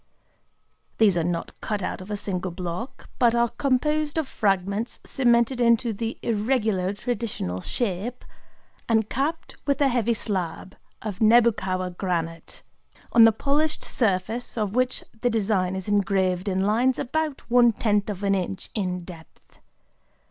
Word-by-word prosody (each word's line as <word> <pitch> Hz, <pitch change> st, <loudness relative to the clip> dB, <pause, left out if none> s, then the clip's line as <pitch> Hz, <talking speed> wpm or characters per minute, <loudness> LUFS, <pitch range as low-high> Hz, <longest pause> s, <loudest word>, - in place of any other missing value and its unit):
These 210 Hz, -5 st, +4 dB
are 170 Hz, -, +1 dB
not 170 Hz, 0 st, -2 dB
cut 210 Hz, -3 st, -2 dB
out -, -, -3 dB
of 185 Hz, -, -10 dB
a 210 Hz, -, -2 dB
single 190 Hz, -2 st, -3 dB
block, 180 Hz, +7 st, -6 dB
but 235 Hz, -1 st, +4 dB
are 235 Hz, 0 st, +3 dB
composed 295 Hz, +4 st, 0 dB
of 315 Hz, -4 st, 0 dB
fragments 200 Hz, +1 st, -1 dB
cemented 240 Hz, 0 st, +2 dB
into 235 Hz, -1 st, +3 dB
the 225 Hz, +2 st, -4 dB
irregular 215 Hz, -4 st, 0 dB
traditional 205 Hz, -, -3 dB
shape, 230 Hz, -, -3 dB, 0.6 s
and 220 Hz, -2 st, +3 dB
capped 295 Hz, +6 st, -2 dB
with 280 Hz, -1 st, +1 dB
a 280 Hz, -2 st, +4 dB
heavy 235 Hz, -2 st, +1 dB
slab 190 Hz, -4 st, -3 dB, 0.3 s
of 205 Hz, -4 st, -5 dB
Nebukawa 215 Hz, -5 st, +3 dB
granite, 165 Hz, -3 st, -4 dB, 0.5 s
on 230 Hz, -1 st, +8 dB
the 225 Hz, -, +7 dB
polished 295 Hz, +7 st, 0 dB
surface 220 Hz, +3 st, -1 dB
of 210 Hz, -3 st, -1 dB
which 255 Hz, +1 st, 0 dB, 0.2 s
the 245 Hz, -, +2 dB
design 195 Hz, -5 st, 0 dB
is 190 Hz, 0 st, -4 dB
engraved 190 Hz, -2 st, +1 dB
in 190 Hz, 0 st, 0 dB
lines 245 Hz, +5 st, +2 dB
about 300 Hz, +2 st, -2 dB
one 240 Hz, -1 st, +6 dB
tenth 210 Hz, -2 st, 0 dB
of 205 Hz, -1 st, -5 dB
an 200 Hz, 0 st, +2 dB
inch 190 Hz, 0 st, -3 dB
in 180 Hz, -4 st, -2 dB
depth. 170 Hz, -2 st, -14 dB
215 Hz, 145 wpm, -25 LUFS, 185-240 Hz, 0.6 s, on